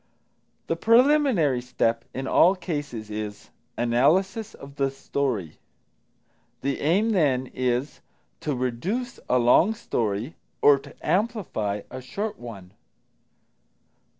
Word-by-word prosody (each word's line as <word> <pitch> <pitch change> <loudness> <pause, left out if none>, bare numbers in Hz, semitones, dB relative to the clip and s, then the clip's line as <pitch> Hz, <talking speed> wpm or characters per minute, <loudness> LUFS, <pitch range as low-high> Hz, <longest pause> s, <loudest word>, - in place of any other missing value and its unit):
The 165 - -1
preliminary 230 - +4
step 115 -2 -1
in 130 - -5
all 180 +7 +5
cases 145 - -5
is 105 -1 -6 0.3
Analysis 165 - +1
of 140 0 -13
the 135 -1 +1
Story. 135 - -3 1.0
The 140 0 -1
aim, 195 +9 +2
then, 135 - +1
is 125 +2 -1 0.4
to 150 -3 -2
reduce 175 - -3
a 125 - +4
long 145 - +4
story 115 - -2 0.3
or 145 -1 +6
to 140 +1 -14
amplify 180 - -1
a 130 +1 -6
short 205 - -4
one. 100 -7 -10
140 Hz, 110 wpm, -25 LUFS, 120-190 Hz, 1.0 s, or